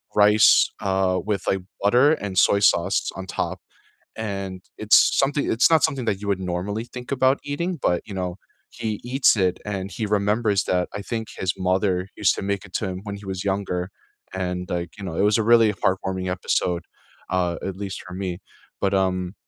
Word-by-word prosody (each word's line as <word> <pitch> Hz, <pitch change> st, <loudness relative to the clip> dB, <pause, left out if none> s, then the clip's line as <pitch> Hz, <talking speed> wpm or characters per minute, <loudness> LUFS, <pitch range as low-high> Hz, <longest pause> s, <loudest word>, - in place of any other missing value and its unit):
rice, 105 Hz, +1 st, +6 dB
uh, 95 Hz, -1 st, +1 dB
with 100 Hz, -3 st, -1 dB
like 95 Hz, -, +1 dB, 0.2 s
butter 125 Hz, +8 st, +5 dB
and 100 Hz, -10 st, -4 dB
soy 100 Hz, -, +5 dB
sauce 95 Hz, -2 st, +2 dB
on 95 Hz, -, -6 dB
top, -, -, -3 dB, 0.6 s
and 95 Hz, -4 st, -5 dB, 0.2 s
it's 110 Hz, 0 st, +5 dB
something 140 Hz, +1 st, +1 dB
It's 115 Hz, -, +4 dB
not 160 Hz, -2 st, +5 dB
something 130 Hz, -4 st, 0 dB
that 100 Hz, -3 st, 0 dB
you 105 Hz, -, -5 dB
would 100 Hz, -2 st, 0 dB
normally 95 Hz, +4 st, -3 dB
think 125 Hz, +2 st, -8 dB
about 130 Hz, 0 st, +3 dB
eating, 170 Hz, +4 st, -3 dB
but 90 Hz, -6 st, +1 dB
you 100 Hz, -, -8 dB
know, 90 Hz, -1 st, -3 dB, 0.3 s
he 110 Hz, -2 st, -4 dB
eats 130 Hz, 0 st, +3 dB
it 95 Hz, -3 st, +1 dB
and 100 Hz, -2 st, -4 dB
he 110 Hz, -2 st, -3 dB
remembers 105 Hz, 0 st, +1 dB
that, 90 Hz, -1 st, 0 dB
I 100 Hz, -, -4 dB
think 110 Hz, +1 st, -4 dB
his 95 Hz, -1 st, 0 dB
mother 95 Hz, 0 st, 0 dB
used -, -, +3 dB
to -, -, -4 dB
make 100 Hz, -1 st, -2 dB
it 95 Hz, -, -14 dB
to 105 Hz, -, -1 dB
him 95 Hz, 0 st, -5 dB
when 100 Hz, -1 st, -5 dB
he 100 Hz, -, -12 dB
was 95 Hz, 0 st, -4 dB
younger 95 Hz, -2 st, -2 dB, 0.4 s
and 90 Hz, -1 st, -3 dB
like, 85 Hz, -1 st, -2 dB
you 100 Hz, -, -7 dB
know, 85 Hz, -4 st, -5 dB
it -, -, +1 dB
was 105 Hz, +2 st, +3 dB
a 110 Hz, -, +2 dB
really 115 Hz, -1 st, +5 dB
heartwarming 95 Hz, -1 st, -1 dB
episode, 90 Hz, -1 st, -1 dB, 0.5 s
uh, 90 Hz, -2 st, 0 dB
at 95 Hz, -1 st, -4 dB
least 100 Hz, -1 st, -6 dB
for 90 Hz, -, -8 dB
me, 90 Hz, -2 st, -4 dB, 0.4 s
but 100 Hz, -, +1 dB
um, 95 Hz, 0 st, 0 dB
100 Hz, 195 wpm, -23 LUFS, 95-110 Hz, 0.6 s, rice